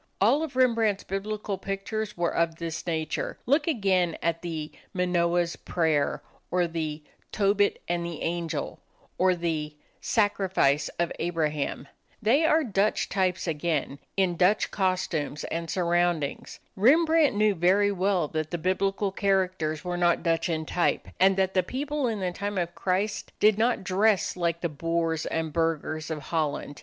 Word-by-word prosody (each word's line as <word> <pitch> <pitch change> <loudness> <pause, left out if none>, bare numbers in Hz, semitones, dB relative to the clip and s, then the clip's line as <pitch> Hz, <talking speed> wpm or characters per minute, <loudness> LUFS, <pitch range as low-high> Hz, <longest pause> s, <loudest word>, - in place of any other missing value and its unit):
All 240 +10 +4
of 310 -5 -4
Rembrandt's 230 -5 +2
Biblical 200 0 -4
pictures 205 +2 -4
were 170 -1 0
of 170 -1 +1
this 165 0 -5
nature. 160 -2 -2
Look 290 +5 +2
again 190 - +1
at 165 0 0
the 160 -3 -5 0.2
"Manoah's 175 -1 +1
Prayer," 160 -4 0 0.3
or 180 0 +2
the 160 -2 -4 0.3
"Tobit 205 0 +2
and 175 0 -1
the 170 -2 -5
Angel," 165 -3 -3 0.4
or 185 0 +4
the 160 -3 -2 0.2
"Sacrifice 190 - +1
of 170 -1 0
Abraham." 155 -5 -2 0.3
They 245 +8 +3
are 320 0 +4
Dutch 210 -4 0
types 185 -2 0
again, 150 -4 -2 0.2
in 185 -3 +2
Dutch 190 +5 +3
costumes 180 -6 -1
and 165 0 -4
surroundings. 175 -4 0 0.2
Rembrandt 310 - +4
knew 210 0 +3
very 195 +4 +3
well 190 -3 +1
that 155 -1 -3
the 175 - -2
Biblical 195 +3 0
characters 185 -6 0
were 175 0 -2
not 175 -1 +2
Dutch 165 0 +1
in 160 -1 -1
type, 175 +2 0
and 190 +1 +5
that 190 0 +1
the 185 - +4
people 280 +7 -2
in 220 -4 -2
the 180 -1 -1
time 200 +2 -4
of 175 -1 -1
Christ 195 +4 -2
did 215 0 +4
not 235 -2 +2
dress 195 +2 +2
like 170 -2 -1
the 170 - +1
boors 165 +1 -1
and 160 -2 -2
burghers 155 -1 -1
of 155 -3 -4
Holland. 150 -2 -2
180 Hz, 150 wpm, -27 LUFS, 165-200 Hz, 0.4 s, and